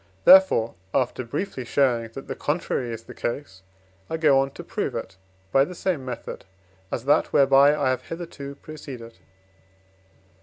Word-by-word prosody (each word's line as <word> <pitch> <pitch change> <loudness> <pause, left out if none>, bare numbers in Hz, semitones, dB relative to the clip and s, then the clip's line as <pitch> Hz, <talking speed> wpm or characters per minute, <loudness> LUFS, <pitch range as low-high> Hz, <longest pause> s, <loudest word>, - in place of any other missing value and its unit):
Therefore, 275 - +7 0.2
after 125 0 0
briefly 135 +2 -4
showing 120 -3 +1
that 135 - -8
the - - -3
contrary 145 -5 -2
is 115 0 -6
the - - -11
case, 120 -6 -5 0.5
I 160 - -2
go 150 -4 +4
on 135 0 +1
to - - -9
prove - - -3
it 95 0 -5 0.4
by 135 - +5
the 180 +5 -6
same 170 -6 -1
method, 125 -2 -6 0.5
as 120 - -3
that 145 - +3
whereby 140 +1 +6
I 140 - +1
have 130 0 -4
hitherto 155 -5 -7
proceeded. 130 -7 -10
135 Hz, 155 wpm, -24 LUFS, 120-150 Hz, 0.5 s, Therefore